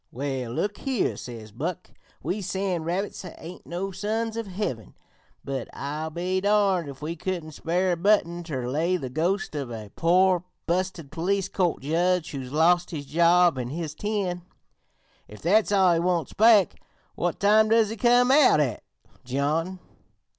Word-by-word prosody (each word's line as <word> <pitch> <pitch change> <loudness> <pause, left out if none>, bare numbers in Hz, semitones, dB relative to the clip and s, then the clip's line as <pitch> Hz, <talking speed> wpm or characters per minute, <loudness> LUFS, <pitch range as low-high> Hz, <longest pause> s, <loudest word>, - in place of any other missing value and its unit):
"'Well, 130 -2 -3
look 205 - -2
here,' 265 -6 -1
says 115 -3 -9
Buck, 165 - -5 0.3
'we 205 +3 -2
sand 185 -3 -2
rabbits 195 +4 -3
ain't 170 +3 -11
no 185 +3 -3
sons 220 +4 -2
of 230 -2 -4
Heaven, 180 - -4 0.5
but 135 -3 -3
I'll 150 +3 -4
be 180 +3 -2
darned 200 -5 +2
if 140 +1 -10
we 165 +2 -3
couldn't 170 -2 -4
spare 180 +5 0
a - - +2
button 175 -2 +2
ter 130 -7 -4
lay 165 +8 +1
the 130 -7 -6
ghost 175 +8 -1
of 140 -4 -4
a 110 -3 -8
pore 180 +1 +3 0.2
busted 175 -4 -2
police 190 +3 -1
court 175 -7 0
judge, 175 +3 +1
who's 130 -3 -6
lost 175 +4 +3
his 145 -4 -6
job 170 0 +4
an' 120 -1 -3
his 155 +1 -4
tin, 195 -2 -2 0.9
if 105 - -12
that's 205 +6 +2
all 190 -3 +5
he 165 - +1
wants 175 -1 0
back. 215 -3 +4 0.3
What 175 -1 -2
time 215 +2 +4
does 225 -1 +4
he - - -4
come 245 +3 +4
out 275 - +6
at, 130 -7 0 0.4
John? 150 +8 -1
175 Hz, 160 wpm, -25 LUFS, 150-195 Hz, 0.9 s, out